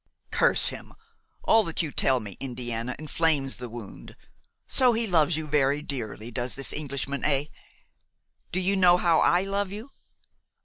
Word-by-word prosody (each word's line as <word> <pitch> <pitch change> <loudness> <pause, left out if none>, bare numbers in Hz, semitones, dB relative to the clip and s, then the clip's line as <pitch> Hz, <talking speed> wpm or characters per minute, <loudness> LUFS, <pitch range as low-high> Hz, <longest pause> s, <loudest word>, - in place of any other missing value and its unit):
"Curse - - +4
him! - - -10 0.5
all 225 - +5
that 165 +1 -2
you 155 - -4
tell 130 -2 +2
me, 100 -5 -9
Indiana, 120 -2 -4
inflames 155 -3 0
the 125 -1 -7
wound. 115 -3 -10 0.5
So 250 -2 +4
he 230 +1 0
loves 165 -5 +2
you 160 - -4
very 145 -1 +1
dearly, 115 -5 -6
does 120 +2 -3
this 135 -1 -4
Englishman, 140 -2 -4
eh? 140 -1 +2 1.1
Do 180 - -1
you 190 +2 +1
know 180 -2 +5
how 170 -3 +3
I 175 +2 +3
love 195 0 -2
you?" 220 +7 -8
150 Hz, 160 wpm, -26 LUFS, 125-180 Hz, 1.1 s, all